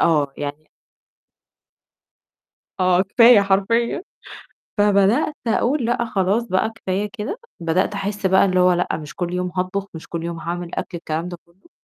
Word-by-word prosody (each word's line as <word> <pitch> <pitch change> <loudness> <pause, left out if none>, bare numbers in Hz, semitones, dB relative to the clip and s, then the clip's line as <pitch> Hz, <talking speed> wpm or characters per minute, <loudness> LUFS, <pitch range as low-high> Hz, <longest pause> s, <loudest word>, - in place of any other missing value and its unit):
آه 150 -4 +2
يعني 145 +1 -5 2.1
آه 185 0 +4
كفاية 230 +3 +6
حرفيًا، 200 - +1 0.8
فبدأت 205 +8 +3
أقُول 245 +4 +1
لأ 235 0 0
خلاص 200 +1 +1
بقى 185 +2 +1
كفاية 205 -1 -2
كده 240 - -5 0.2
بدأت 170 +5 0
أحس 200 0 -4
بقى 190 +1 +5
اللي 185 -1 +1
هو 180 0 +5
لأ 175 - 0
مش 150 0 -9
كل 175 -1 -3
يوم 180 0 -2
هاطبخ، 190 +2 -2
مش 160 - -9
كل 170 -1 -5
يوم 170 -1 -4
هاعمل 170 +1 -5
أكل 175 - -4
الكلام 165 +1 -3
ده 175 - -7
كُلّه، 175 - -27
190 Hz, 150 wpm, -21 LUFS, 175-210 Hz, 2.1 s, كفاية